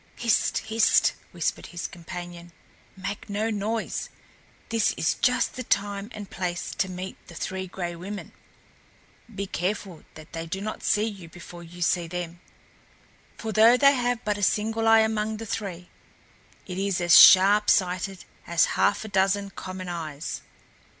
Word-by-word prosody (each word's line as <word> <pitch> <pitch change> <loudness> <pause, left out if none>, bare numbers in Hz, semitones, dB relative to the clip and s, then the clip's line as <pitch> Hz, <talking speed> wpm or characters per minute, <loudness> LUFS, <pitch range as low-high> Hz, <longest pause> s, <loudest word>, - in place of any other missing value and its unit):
"Hist! 230 -2 +1
hist!" 220 0 +3 0.2
whispered - - -2
his 175 0 -6
companion. 175 -1 -8 0.4
"Make 200 +3 -6
no 215 +3 -1
noise! 215 +2 -3 0.6
This 225 -2 +2
is 160 - +1
just 250 -1 +1
the 255 - -6
time 200 -1 -1
and 210 -2 -8
place 175 -2 -4
to 190 - +1
meet 185 +1 -6
the 170 - -12
Three 190 +3 -4
Gray 175 -2 -5
Women. 195 +4 -7 1.0
Be 200 0 -3
careful 185 -2 -3
that 155 0 -13
they 165 0 -5
do 190 +4 -4
not 215 +2 -5
see 210 +1 +2
you 195 -6 -7
before 175 +1 -11
you 175 +1 -6
see 170 0 +1
them, 175 0 -5 1.0
for 220 - -4
though 225 +3 +6
they 275 +1 +6
have 245 -3 -1
but 210 -1 0
a - - -5
single 220 +4 +1
eye 225 0 +7
among 220 0 -1
the 225 - -7
three, 195 -4 -5 0.7
it 185 0 -5
is 195 -2 0
as 175 -1 +5
sharp 200 +3 +8
sighted 185 +1 +1 0.2
as 170 -1 +4
half 205 - +1
a - - -5
dozen 195 0 +1
common 185 -1 -7
eyes." 155 - -5
195 Hz, 155 wpm, -26 LUFS, 175-215 Hz, 1.0 s, sharp